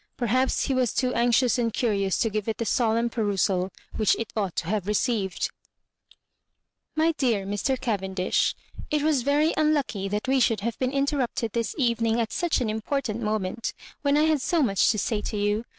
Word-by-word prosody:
Perhaps 255 Hz, +2 st, +1 dB
h6 275 Hz, -, +1 dB
was 250 Hz, -4 st, +1 dB
too 255 Hz, -1 st, +1 dB
anxious 240 Hz, 0 st, +3 dB
and 230 Hz, -1 st, +1 dB
curioua 205 Hz, -4 st, 0 dB
to 225 Hz, -, +2 dB
give 215 Hz, 0 st, -2 dB
it 220 Hz, -, -1 dB
the 230 Hz, -, -2 dB
solemn 230 Hz, 0 st, +2 dB
perusal 200 Hz, -5 st, 0 dB, 0.3 s
which 215 Hz, -3 st, +3 dB
it 230 Hz, -, -5 dB
ought 200 Hz, -5 st, -1 dB
to -, -, -2 dB
have 200 Hz, +1 st, -2 dB
received. 210 Hz, -3 st, 0 dB, 1.4 s
"Mt 320 Hz, +1 st, +2 dB
deab 225 Hz, -7 st, +1 dB
Mr. 205 Hz, +6 st, -1 dB
Cayendish, 190 Hz, -6 st, 0 dB, 0.2 s
— -, -, -30 dB
It 300 Hz, -1 st, 0 dB
was 300 Hz, -4 st, +2 dB
very 290 Hz, +5 st, +2 dB
unlucky 290 Hz, -10 st, +1 dB
that 210 Hz, +4 st, -3 dB
we 265 Hz, 0 st, +3 dB
should 225 Hz, -4 st, +2 dB
have 230 Hz, +2 st, -3 dB
been 255 Hz, -1 st, 0 dB
interrupted 275 Hz, -5 st, -1 dB
this 230 Hz, -1 st, -2 dB
evening 235 Hz, -3 st, +1 dB
at 225 Hz, -1 st, -1 dB
such 340 Hz, -6 st, 0 dB
an 230 Hz, -, 0 dB
important 230 Hz, +1 st, -2 dB
moment, 215 Hz, 0 st, -2 dB, 0.3 s
when 285 Hz, 0 st, +2 dB
I 300 Hz, -, +4 dB
had 310 Hz, -3 st, +2 dB
so 335 Hz, +2 st, +2 dB
much 195 Hz, -6 st, +3 dB
to 215 Hz, -, +1 dB
say 210 Hz, +1 st, -1 dB
to 210 Hz, -, -4 dB
you. 205 Hz, +2 st, 0 dB
230 Hz, 190 wpm, -26 LUFS, 210-265 Hz, 1.4 s, I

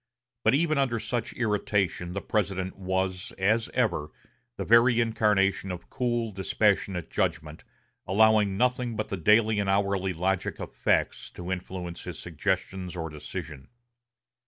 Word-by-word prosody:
But -, -, +4 dB
even 155 Hz, -1 st, +2 dB
under 130 Hz, -4 st, +1 dB
such 120 Hz, 0 st, -3 dB
irritation 105 Hz, -5 st, 0 dB
the 100 Hz, -, -4 dB
President 95 Hz, -3 st, -1 dB
was, 95 Hz, -1 st, -2 dB
as 110 Hz, +4 st, +2 dB
ever, 110 Hz, -12 st, +1 dB, 0.5 s
the -, -, -3 dB
very 115 Hz, +1 st, +5 dB
incarnation 105 Hz, -4 st, +2 dB
of 85 Hz, -2 st, -8 dB
cool, 120 Hz, -3 st, -1 dB
dispassionate 95 Hz, -3 st, 0 dB
judgment, 80 Hz, -5 st, -2 dB, 0.4 s
allowing 105 Hz, 0 st, +4 dB
nothing 125 Hz, 0 st, +1 dB
but 110 Hz, -, -3 dB
the -, -, -2 dB
daily 105 Hz, +4 st, +4 dB
and 100 Hz, -1 st, 0 dB
hourly 95 Hz, -1 st, +1 dB
logic 95 Hz, +3 st, -1 dB
of -, -, -7 dB
facts -, -, 0 dB
to 90 Hz, +1 st, -6 dB
influence 90 Hz, -2 st, -5 dB
his -, -, -6 dB
suggestions 90 Hz, +2 st, -3 dB
or 80 Hz, -2 st, -4 dB
decision. 75 Hz, -1 st, -7 dB
95 Hz, 135 wpm, -27 LUFS, 90-110 Hz, 0.5 s, very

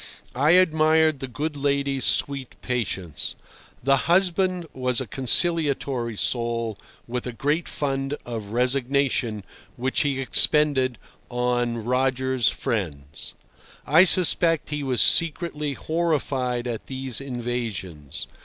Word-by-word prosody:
I 145 Hz, +6 st, +3 dB
admired 160 Hz, -3 st, +4 dB
the 135 Hz, -, -4 dB
good 150 Hz, +5 st, -4 dB
lady's 140 Hz, -2 st, 0 dB
sweet 140 Hz, -3 st, -1 dB
patience. 95 Hz, -, -3 dB, 0.5 s
The 135 Hz, +1 st, +4 dB
husband 185 Hz, 0 st, +2 dB
was 125 Hz, -2 st, 0 dB
a 130 Hz, -, -2 dB
conciliatory 135 Hz, -, +1 dB
soul, 115 Hz, -2 st, -1 dB, 0.3 s
with 125 Hz, +1 st, -4 dB
a -, -, -3 dB
great 145 Hz, +8 st, -1 dB
fund 135 Hz, 0 st, -2 dB
of 115 Hz, -4 st, -5 dB
resignation, 125 Hz, -2 st, 0 dB, 0.3 s
which 130 Hz, +2 st, -1 dB
he 140 Hz, -2 st, 0 dB
expended 135 Hz, -2 st, +2 dB, 0.3 s
on 120 Hz, -1 st, -1 dB
"Roger's 130 Hz, 0 st, +1 dB
friends." 75 Hz, -10 st, -4 dB, 0.5 s
I 155 Hz, +6 st, +6 dB
suspect 170 Hz, -3 st, +3 dB
he 150 Hz, 0 st, -2 dB
was 130 Hz, -3 st, +3 dB
secretly 155 Hz, -3 st, +1 dB
horrified 135 Hz, -6 st, -1 dB
at 120 Hz, -3 st, -5 dB
these 130 Hz, -2 st, -3 dB
invasions. 115 Hz, -, -5 dB
130 Hz, 110 wpm, -24 LUFS, 120-150 Hz, 0.5 s, I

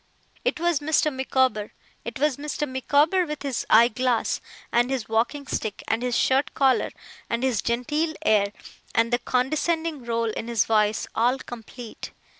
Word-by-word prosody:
It -, -, 0 dB
was 345 Hz, -3 st, +2 dB
Mr. 305 Hz, 0 st, +1 dB
Micawber! 260 Hz, -5 st, 0 dB, 0.3 s
It 235 Hz, 0 st, -6 dB
was 290 Hz, -1 st, +1 dB
Mr. 295 Hz, +1 st, -3 dB
Micawber, 290 Hz, +7 st, +2 dB
with 300 Hz, -1 st, -5 dB
his 275 Hz, -4 st, -2 dB
eye 230 Hz, +2 st, +7 dB
glass, 245 Hz, 0 st, 0 dB, 0.3 s
and 240 Hz, +1 st, +3 dB
his 265 Hz, -5 st, -2 dB
walking 235 Hz, +6 st, 0 dB
stick, 215 Hz, -5 st, -3 dB
and 225 Hz, +1 st, 0 dB
his 250 Hz, -1 st, 0 dB
shirt 265 Hz, +2 st, +2 dB
collar, 265 Hz, -2 st, +3 dB, 0.4 s
and 235 Hz, +2 st, -1 dB
his 250 Hz, -6 st, +1 dB
genteel 295 Hz, +7 st, -1 dB
air, 200 Hz, -2 st, +3 dB, 0.4 s
and 230 Hz, +1 st, +2 dB
the 240 Hz, -, +3 dB
condescending 305 Hz, +4 st, 0 dB
roll 230 Hz, -1 st, -1 dB
in 225 Hz, -, -5 dB
his 235 Hz, -4 st, +2 dB
voice, 215 Hz, -1 st, +2 dB
all 245 Hz, +4 st, +2 dB
complete! 240 Hz, -2 st, -9 dB
250 Hz, 160 wpm, -25 LUFS, 230-290 Hz, 0.4 s, eye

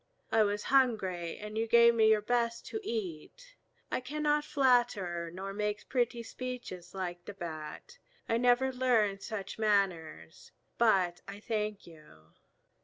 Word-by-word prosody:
I 225 Hz, -, +4 dB
was 205 Hz, 0 st, +1 dB
hungry, 195 Hz, -10 st, +2 dB
and 210 Hz, 0 st, -8 dB
you 225 Hz, -, 0 dB
gave 235 Hz, +1 st, +6 dB
me 220 Hz, -1 st, +4 dB
your 215 Hz, -1 st, +3 dB
best 235 Hz, 0 st, 0 dB
to 440 Hz, -, -3 dB
eat. 230 Hz, -, -6 dB, 0.4 s
I -, -, 0 dB
cannot 295 Hz, +3 st, 0 dB
flatter 240 Hz, -, +1 dB
nor 190 Hz, +3 st, -6 dB
make 210 Hz, 0 st, -3 dB
pretty 240 Hz, -2 st, 0 dB
speeches 240 Hz, -8 st, -7 dB
like 175 Hz, -2 st, -5 dB
the 205 Hz, -, -8 dB
Bat. 160 Hz, -4 st, -8 dB, 0.3 s
I 230 Hz, -, +2 dB
never 250 Hz, +2 st, +3 dB
learned 225 Hz, -6 st, +2 dB
such 205 Hz, -2 st, -6 dB
manners. 180 Hz, -, -1 dB, 0.3 s
But 190 Hz, -7 st, +3 dB
I 200 Hz, +1 st, -8 dB
thank 210 Hz, -1 st, -3 dB
you." 150 Hz, -, -17 dB
210 Hz, 140 wpm, -31 LUFS, 185-245 Hz, 0.4 s, gave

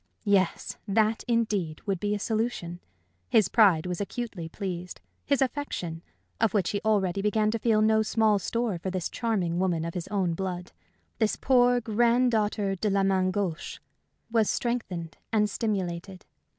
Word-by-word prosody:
Yes, 195 Hz, -3 st, +1 dB
that, 215 Hz, +2 st, +2 dB
indeed, 210 Hz, -9 st, 0 dB
would 195 Hz, -4 st, -1 dB
be 205 Hz, +2 st, 0 dB
a -, -, -1 dB
solution. 215 Hz, -5 st, -2 dB, 0.5 s
His 210 Hz, -5 st, +4 dB
pride 195 Hz, -8 st, +5 dB
was 180 Hz, +1 st, -3 dB
acutely 200 Hz, -6 st, -5 dB
pleased; 180 Hz, -2 st, -5 dB, 0.3 s
his 280 Hz, -1 st, +3 dB
affection 210 Hz, -, -4 dB, 0.4 s
of 220 Hz, -2 st, +2 dB
which 190 Hz, -5 st, +2 dB
he 205 Hz, -, -2 dB
already 200 Hz, -3 st, +1 dB
began 210 Hz, +1 st, +2 dB
to 230 Hz, -, -2 dB
feel 215 Hz, -1 st, +3 dB
no 220 Hz, 0 st, +4 dB
small 220 Hz, -1 st, +2 dB
store 230 Hz, -2 st, -2 dB
for 190 Hz, -, -3 dB
this 185 Hz, -2 st, -3 dB
charming 190 Hz, -8 st, -1 dB
woman 175 Hz, -3 st, 0 dB
of 170 Hz, -, -4 dB
his 180 Hz, -1 st, -4 dB
own 195 Hz, -4 st, 0 dB
blood, 180 Hz, 0 st, -4 dB, 0.5 s
this 220 Hz, -2 st, +2 dB
poor 245 Hz, -1 st, +4 dB
granddaughter 225 Hz, -3 st, +2 dB
de 210 Hz, +3 st, -1 dB
la 195 Hz, 0 st, +2 dB
main 190 Hz, -1 st, +2 dB
gauche 185 Hz, -4 st, -3 dB, 0.5 s
was 225 Hz, -2 st, +3 dB
strengthened 190 Hz, -9 st, -2 dB
and 210 Hz, -1 st, +2 dB
stimulated. 190 Hz, -3 st, -3 dB
205 Hz, 155 wpm, -27 LUFS, 180-225 Hz, 0.5 s, pride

